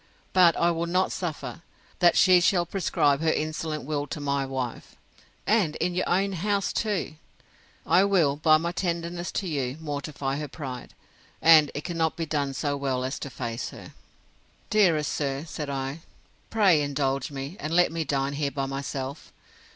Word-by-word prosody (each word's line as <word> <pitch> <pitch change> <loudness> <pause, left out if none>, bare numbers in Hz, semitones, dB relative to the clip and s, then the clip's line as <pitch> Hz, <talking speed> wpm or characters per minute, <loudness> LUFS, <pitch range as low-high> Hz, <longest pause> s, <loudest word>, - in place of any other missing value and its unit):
But 175 -3 +6
I 170 0 +3
will 170 0 -2
not 185 +2 +1
suffer, 170 -1 -5 0.4
that 175 -2 +5
she 185 -2 +6
shall 175 -1 +3
prescribe 150 -6 +1
her 160 -1 +3
insolent 155 0 -2
will 145 +1 -2
to 150 - -5
my 140 -1 -1
wife, 130 -3 -5 0.5
and 195 -8 +2
in 180 - -1
your 180 +1 -1
own 195 +3 +2
house 200 +2 -1
too.—I 185 -2 -2
will, 170 -8 +3
by 155 +1 +5
my 170 +2 -2
tenderness 175 -1 -3
to 195 - -2
you, 135 -4 -2
mortify 145 -2 -3
her 150 0 -4
pride; 130 -4 -8 0.4
and 155 -3 +7
it 145 - -4
cannot 165 -2 -1
be 165 - -3
done 145 -3 -2
so 145 +1 -1
well 135 -2 -1
as 130 +2 -3
to - - -5
her - - -18
face. 115 -2 -4 1.0
Dearest 170 -8 +3
sir, 140 0 -2
said 150 -2 -5
I, 135 +2 -3 0.5
pray 195 -8 +4
indulge 140 -2 -1
me, 140 +3 -6
and 155 - -4
let 175 0 +4
me 165 0 -2
dine 140 -1 -1
here 145 0 -1
by 140 -1 -3
myself. 135 +1 -5
155 Hz, 165 wpm, -26 LUFS, 140-175 Hz, 1.0 s, and